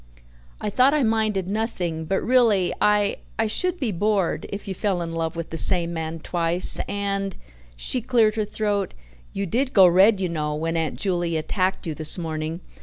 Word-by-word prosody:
I 210 - -3
thought 260 +6 +4
I 295 - +2
minded 215 -4 0
nothing, 185 -6 -3
but 190 +4 -1
really 230 -7 +3
I 210 -1 +2 0.2
I 225 - +1
should 360 +11 0
be 255 -7 -1
bored 200 -1 -1
if 200 0 -7
you 195 - -3
fell 190 -1 -1
in 165 0 -6
love 165 0 -3
with 165 0 -6
the 165 - 0
same 170 -2 +6
man 160 0 -5
twice 175 +1 +1
and" 195 -1 -3 0.4
she 240 - -1
cleared 230 -2 +2
her 215 -1 -1
throat 205 -3 -2 0.4
"you 200 - -3
did 255 +8 -1
go 190 -2 +7
red, 190 +4 +5
you 185 - -1
know, 150 -3 -3
when 165 +2 -2
Aunt 160 -1 -1
Juley 175 -4 -1
attacked 185 +5 -2
you 160 - -3
this 155 +3 0
morning. 160 0 -4
190 Hz, 185 wpm, -23 LUFS, 165-215 Hz, 0.4 s, go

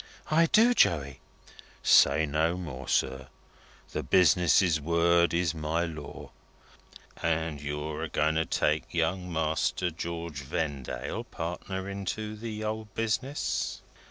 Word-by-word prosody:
"I 165 +2 +5
do, 230 +4 +5
Joey." 70 - +2 0.6
"Say 80 - +5
no 80 +4 0
more, 70 -7 -7
sir. 65 0 0 0.6
The - - -2
Business's 90 -2 +4
word 85 +2 +3
is 85 -1 +1
my 80 +2 -1
law. 75 -4 -8 0.9
And 80 -2 -1
you're 75 +1 -4
a 80 - -3
going 75 +1 +1
to 80 +1 +1
take 75 +3 0
Young 90 +2 0
Master 80 +2 0
George 85 -2 -5
Vendale 70 -1 -4
partner 95 +3 -5
into 100 +2 -4
the 110 0 -6
old 110 -1 -4
Business?" 125 +5 -2
85 Hz, 120 wpm, -28 LUFS, 75-95 Hz, 0.9 s, I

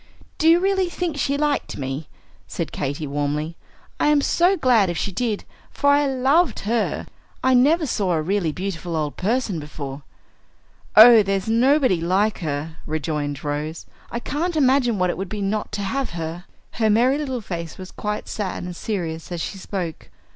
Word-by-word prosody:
"Do 320 - +5
you 335 +1 +6
really 380 -1 +1
think 345 -3 -3
she 280 +1 +1
liked 295 -1 -1
me?" 135 +2 -4 0.4
said - - -4
Katy, 145 +2 -3
warmly. 145 +3 -2 0.4
"I - - +3
am 295 -1 +5
so 355 +6 +3
glad 230 - +4
if 175 - -2
she 200 - -2
did, 215 +1 -2 0.3
for 285 - +2
I 285 0 +4
loved 270 +3 +2
her. 225 +2 -1 0.4
I 260 - +4
never 300 +7 +4
saw 200 -8 0
a 160 - +1
really 185 -2 0
beautiful 175 -1 -4
old 150 -2 -2
person 215 -3 -1
before." 145 -2 -7 0.9
"Oh, 225 +1 +10
there's 195 0 -1
nobody 245 - +3
like 195 +5 +1
her," 155 0 -4
rejoined 150 -2 -3
Rose. 150 +2 -3 0.2
"I 235 - -3
can't 320 +7 -2
imagine 260 -5 +3
what 180 -1 +2
it - - -6
would 195 -1 -4
be 210 - -4
not 205 +1 -2
to 205 -1 -2
have 270 +7 -2
her." 165 +2 -5 0.3
Her 220 -1 +1
merry 250 +6 +3
little 265 -4 -2
face 170 -6 -6
was 185 -1 -9
quite 210 0 -4
sad 200 -4 -4
and 180 0 -6
serious 170 -5 -4
as 175 - -3
she 195 +4 -4
spoke. 180 -5 -5
200 Hz, 175 wpm, -22 LUFS, 165-260 Hz, 0.9 s, Oh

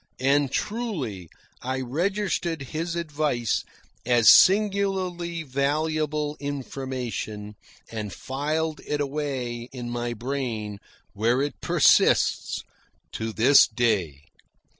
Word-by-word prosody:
And, 140 +1 +2
truly, 155 - -3 0.3
I 130 +1 -2
registered 170 +2 -1
his 165 +2 -2
advice 150 -8 -1 0.4
as 120 -2 +7
singularly 190 -4 +2
valuable 150 +2 -1
information, 130 -6 -5 0.4
and 105 -3 -4
filed 150 - -2
it 150 - -1
away 135 -5 -3
in 120 -2 -6
my 120 0 -2
brain, 115 -5 -4 0.3
where 115 +4 +1
it 145 - -5
persists - - +3 0.5
to 110 0 -4
this 130 +6 +6
day. 95 - 0
140 Hz, 95 wpm, -25 LUFS, 120-155 Hz, 0.5 s, as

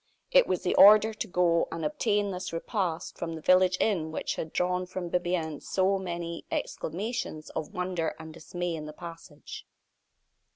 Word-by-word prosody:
It - - +6
was - - -1
the - - +1
order 215 +2 +8
to 220 - -4
go 175 -3 +2
and 165 -2 -4
obtain 205 +6 0
this 180 0 -5
repast 170 -1 -3
from 165 -1 -3
the - - -6
village 185 +2 +4
inn 170 -7 +1
which - - -2
had 160 - -5
drawn 180 0 0
from 180 -1 -5
Bibiaine 175 -4 -1
so 195 +1 +1
many 170 -2 -5
exclamations 180 -3 -4
of 155 - -5
wonder 180 -2 -2
and 160 -1 -10
dismay 175 +2 -4
in 155 -2 -5
the 150 - -8
passage. 165 -3 -10
175 Hz, 165 wpm, -28 LUFS, 165-185 Hz, -, order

